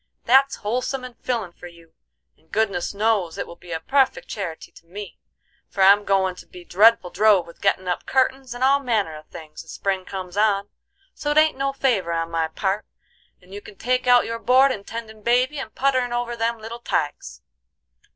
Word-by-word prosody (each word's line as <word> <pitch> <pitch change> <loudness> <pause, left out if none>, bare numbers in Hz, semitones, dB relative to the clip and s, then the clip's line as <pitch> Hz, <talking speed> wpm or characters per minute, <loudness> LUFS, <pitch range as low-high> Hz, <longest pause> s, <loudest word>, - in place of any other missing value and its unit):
That's 270 +2 +4
wholesome 250 +5 -3
and 250 -1 -9
fillin' 230 -8 -3
for 175 - -12
you, 170 -1 -18 0.4
and 160 - -33
goodness 200 -5 0
knows 200 -5 0
it - - -3
will 170 - -11
be 175 0 -14
a 160 - -2
puffect 270 +10 +1
charity 180 -6 -6
to 165 - -19
me, 200 +2 -9 0.5
for 195 - 0
I'm 200 +2 +6
goin' 190 -1 +2
to - - -13
be 180 -1 -13
dreadful 200 -1 +4
drove 205 -3 +4
with 170 - -16
gettin' 190 -2 +1
up 180 - -3
curtins 265 -1 0
and 245 - -3
all 275 +1 +4
manner 220 - -1
of 155 0 -12
things, 155 -2 -11
as - - -12
spring 190 -2 -2
comes 185 -1 -7
on. 205 -1 +2 0.4
So 295 - -4
it 295 - +1
ain't 310 0 +5
no 275 +1 -1
favor 230 -11 0
on 165 0 -2
my 165 -1 0
part, 195 +5 -2 0.6
and 185 +2 -16
you 205 - -7
can 205 - -13
take 250 +4 -1
out 245 0 +6
your 230 0 -4
board 260 +3 +4
in 200 -5 -5
tendin' 220 -1 -8
baby 250 +6 +1
and 220 -5 -8
putterin' 255 -3 +1
over 240 0 -2
them 230 0 -1
little 225 +2 -8
tykes." 150 -10 -3
215 Hz, 200 wpm, -23 LUFS, 180-250 Hz, 0.6 s, I'm